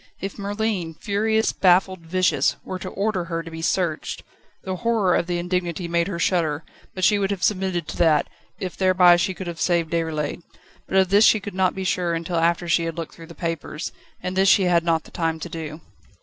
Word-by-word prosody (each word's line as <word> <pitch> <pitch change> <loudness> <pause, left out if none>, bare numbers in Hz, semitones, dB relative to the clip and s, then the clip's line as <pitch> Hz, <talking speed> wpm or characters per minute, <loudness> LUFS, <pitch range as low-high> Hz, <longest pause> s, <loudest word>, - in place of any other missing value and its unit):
If 195 +2 -6
Merlin, 200 -5 -2
furious, 220 +5 0
baffled, 185 0 +3
vicious, 175 +2 +1
were 185 - -5
to 185 - -5
order 195 -2 -1
her 165 -1 -3
to 165 - -9
be 160 0 -7
searched! 165 -2 -1 0.4
The 185 -1 -3
horror 220 -4 +2
of 170 - 0
the 175 -1 -1
indignity 175 0 -2
made 170 0 +1
her 190 -4 -3
shudder, 165 -4 0 0.3
but 185 - -4
she 205 +2 +4
would 195 -1 0
have 200 -3 -3
submitted 185 -5 0
to - - -6
that, 155 -4 +3 0.3
if 185 -2 -4
thereby 185 -2 +5
she 185 +2 -1
could 190 - -6
have 170 -2 -6
saved 170 -3 +1
Déroulède. 160 -1 -2 0.5
But 190 - 0
of 190 -1 +4
this 200 +3 +5
she 215 - +5
could 205 -1 -7
not 185 -1 +1
be 190 - -3
sure 180 -2 0
until 170 +1 -3
after 170 +1 +1
she 170 0 +2
had 165 0 -4
looked 165 -2 -5
through 165 -1 -12
the 170 - -12
papers, 165 -3 -4 0.3
and 185 +1 -3
this 190 +1 +4
she 195 - +5
had 175 -2 +3
not 165 -2 +1
the - - -16
time 165 -1 -1
to 175 - -6
do. 160 -1 -6
175 Hz, 220 wpm, -23 LUFS, 165-190 Hz, 0.5 s, thereby